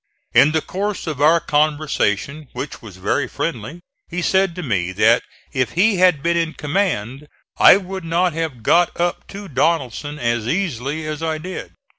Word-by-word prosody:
In 150 - +6
the 160 0 +1
course 205 +2 -3
of 150 -4 -4
our 160 +3 +5
conversation, 150 -3 0
which 145 - -6
was 105 -6 -11
very 95 - 0
friendly, 135 +11 -4 0.3
he 180 0 -4
said 190 -2 +2
to 180 - -5
me 95 - -1
that - - +4 0.3
if 130 -2 -1
he 200 +3 +3
had 180 -6 +3
been 170 0 +1
in 165 -1 0
command 150 - -2 0.3
I - - +8
would 190 -1 -6
not 170 +1 +1
have 155 -8 -4
got 175 +8 +3
up 175 0 -1
to 200 0 -9
Donelson 145 - -1
as 120 -4 -1
easily 155 - -2
as 155 0 -4
I 160 -1 -1
did. 180 +4 -7
155 Hz, 170 wpm, -20 LUFS, 135-175 Hz, 0.3 s, I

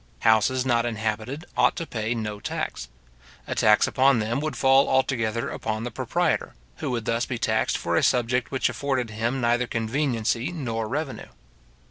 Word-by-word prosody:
Houses 115 +4 +3
not 120 -2 +2
inhabited 110 +6 -3
ought - - +3
to 165 - -4
pay 115 -4 -2
no 105 -2 -4
tax. - - -4 0.6
A - - -3
tax 105 0 +4
upon 135 0 +3
them 115 +3 -1
would 155 -2 -3
fall 135 +2 +4
altogether 120 -4 0
upon 110 0 -3
the 120 - -4
proprietor, - - -1 0.2
who - - -3
would 120 -3 -2
thus 115 +1 0
be 125 - -3
taxed 110 -1 +1
for - - -1
a - - +3
subject 125 0 +1
which 135 - +1
afforded 130 -5 -2
him 115 +5 -1
neither 120 0 +1
conveniency 115 +2 -1
nor 115 -9 -3
revenue. 145 +3 -4
120 Hz, 165 wpm, -25 LUFS, 110-130 Hz, 0.6 s, tax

